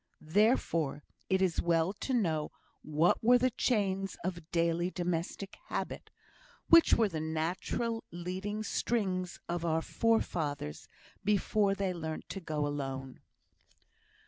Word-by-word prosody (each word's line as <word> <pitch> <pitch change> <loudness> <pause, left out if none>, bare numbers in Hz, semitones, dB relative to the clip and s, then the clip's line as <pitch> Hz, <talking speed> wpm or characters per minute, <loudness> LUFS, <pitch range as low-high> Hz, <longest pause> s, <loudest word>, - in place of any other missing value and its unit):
Therefore 170 - +2 0.3
it 190 0 +3
is 180 -3 +1
well 170 +2 +2
to 210 - -5
know 165 -11 +1 0.3
what 155 +7 +2
were 245 +2 +7
the 255 +1 +2
chains 195 -6 0
of 170 -3 -4
daily 170 +1 +1
domestic 180 +2 -3
habit - - -4 0.6
which 335 0 +8
were 225 - +3
the 165 -5 -4
natural 175 +9 -2
leading 185 +5 -4
strings 185 -6 -1
of 170 0 -2
our 160 -1 +1
forefathers 155 - -1 0.4
before 205 0 +2
they 195 -2 -1
learnt 160 -2 -5
to 195 - -4
go 155 -4 -2
alone. 135 -2 -4
180 Hz, 120 wpm, -32 LUFS, 160-205 Hz, 0.6 s, which